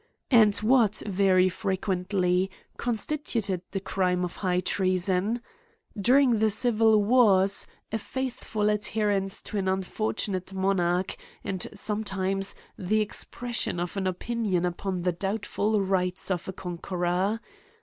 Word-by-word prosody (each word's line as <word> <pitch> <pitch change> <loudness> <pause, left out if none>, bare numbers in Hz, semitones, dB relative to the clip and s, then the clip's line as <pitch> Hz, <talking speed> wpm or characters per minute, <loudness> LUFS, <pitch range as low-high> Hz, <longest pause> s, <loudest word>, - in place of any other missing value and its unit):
And 215 -4 +6
what, 220 -2 +3
very 190 -2 +3
frequently, 185 0 0 0.3
constituted 230 - -2
the 195 - -3
crime 180 -2 0
of 175 - -7
high 180 -2 0
treason? 185 +5 +1 0.5
During 245 +2 +4
the 220 0 +3
civil 220 -1 +3
wars, 200 -4 +4 0.2
a 220 - -1
faithful 230 -4 -2
adherence 210 -2 -1
to 210 - -3
an 190 - -2
unfortunate 190 0 -2
monarch; 185 -1 0 0.3
and, 190 -2 -3
sometimes, 195 -2 -1 0.2
the 205 +4 +1
expres 240 +3 -3
sion 175 - -1
of 175 +1 -3
an 195 -1 -1
opinion 190 -1 -1
upon 180 0 -3
the 180 - +2
doubtful 205 +3 -1
rights 185 -1 0
of 180 -3 -2
a 190 - -4
conqueror. 180 +3 -2
195 Hz, 120 wpm, -27 LUFS, 185-215 Hz, 0.5 s, And